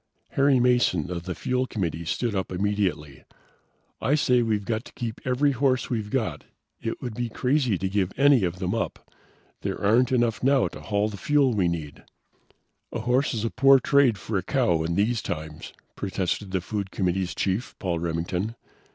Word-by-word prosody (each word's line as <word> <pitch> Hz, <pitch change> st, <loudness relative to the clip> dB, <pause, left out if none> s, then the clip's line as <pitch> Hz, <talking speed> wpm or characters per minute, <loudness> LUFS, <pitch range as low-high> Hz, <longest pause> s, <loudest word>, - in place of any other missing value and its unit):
Harry 140 Hz, -1 st, +3 dB
Mason 120 Hz, -, +2 dB
of 85 Hz, -1 st, -4 dB
the 90 Hz, -, -4 dB
fuel 125 Hz, 0 st, -1 dB
committee 85 Hz, -7 st, -3 dB
stood 105 Hz, +8 st, -1 dB
up 95 Hz, -2 st, -2 dB
immediately. 90 Hz, -7 st, -1 dB, 0.8 s
"I 145 Hz, -, +2 dB
say 125 Hz, -4 st, +3 dB
we've 110 Hz, -3 st, 0 dB
got 110 Hz, 0 st, -1 dB
to -, -, -13 dB
keep 115 Hz, -2 st, -5 dB
every 130 Hz, +3 st, +2 dB
horse 130 Hz, -1 st, +1 dB
we've 110 Hz, -3 st, -2 dB
got. 120 Hz, -1 st, -2 dB, 0.4 s
It 115 Hz, -, -4 dB
would 120 Hz, -3 st, -4 dB
be 120 Hz, +1 st, -3 dB
crazy 125 Hz, -3 st, +1 dB
to 95 Hz, -, -2 dB
give 95 Hz, -1 st, 0 dB
any 135 Hz, -4 st, +5 dB
of 90 Hz, 0 st, -1 dB
them 90 Hz, 0 st, -2 dB
up. -, -, -4 dB, 0.5 s
There -, -, -3 dB
aren't 115 Hz, +5 st, +3 dB
enough 120 Hz, -3 st, +1 dB
now 135 Hz, +1 st, +3 dB
to -, -, -10 dB
haul 105 Hz, 0 st, 0 dB
the 105 Hz, -, -7 dB
fuel 140 Hz, +2 st, +2 dB
we 95 Hz, -5 st, +2 dB
need." 80 Hz, -4 st, -4 dB, 0.9 s
"A 115 Hz, -, -3 dB
horse 125 Hz, +3 st, +1 dB
is 110 Hz, 0 st, -2 dB
a 115 Hz, -, -1 dB
poor 135 Hz, -1 st, +6 dB
trade 130 Hz, -4 st, +3 dB
for 100 Hz, 0 st, -2 dB
a -, -, -6 dB
cow 95 Hz, -, +1 dB
in 85 Hz, +1 st, -1 dB
these 110 Hz, +4 st, +1 dB
times," 80 Hz, +1 st, -6 dB, 0.2 s
protested 95 Hz, 0 st, -2 dB
the 95 Hz, -1 st, -1 dB
food 100 Hz, +1 st, -4 dB
committee's 95 Hz, -1 st, -1 dB
chief, 100 Hz, +6 st, -1 dB
Paul 85 Hz, -3 st, -2 dB
Remington. 85 Hz, +6 st, -2 dB
105 Hz, 185 wpm, -25 LUFS, 90-125 Hz, 0.9 s, poor